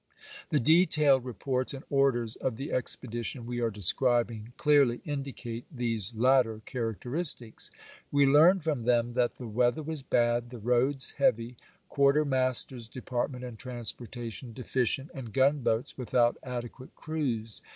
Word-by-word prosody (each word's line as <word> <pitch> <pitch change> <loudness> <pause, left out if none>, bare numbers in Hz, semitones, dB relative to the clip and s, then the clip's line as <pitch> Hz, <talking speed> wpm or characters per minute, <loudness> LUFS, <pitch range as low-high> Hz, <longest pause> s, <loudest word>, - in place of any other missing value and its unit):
The - - +2
detailed 150 -3 +4
reports 130 +2 -2
and 135 - -9
orders 125 -5 +1
of 130 - -3
the 135 +5 -6
expedition 120 -1 -1
we 120 0 -4
are 115 - +1
describing 115 +2 +1
clearly 140 -5 +3
indicate 135 -5 -5
these 115 - -1
latter 120 -2 +3
char 115 -3 -3
acteristics. 125 - 0 0.4
We 145 0 +4
learn 160 +7 +5
from 150 -7 -2
them 120 -1 +1
that 120 -1 0
the 125 - -9
weather 120 +6 +1
was 155 -1 -5
bad, 120 -2 +1
the 125 - -9
roads 125 +4 +3
heavy, 115 +2 +1 0.3
quartermaster's 130 -4 +1
depart 125 0 -3
ment 125 -2 -9
and 120 -3 -8
transportation 120 -1 -5
deficient, 130 +3 -2
and 130 -7 -8
gunboats 135 -1 +1
without 120 -1 +2
adequate 125 0 -8
crews. 125 -9 -4
125 Hz, 135 wpm, -29 LUFS, 120-135 Hz, 0.4 s, learn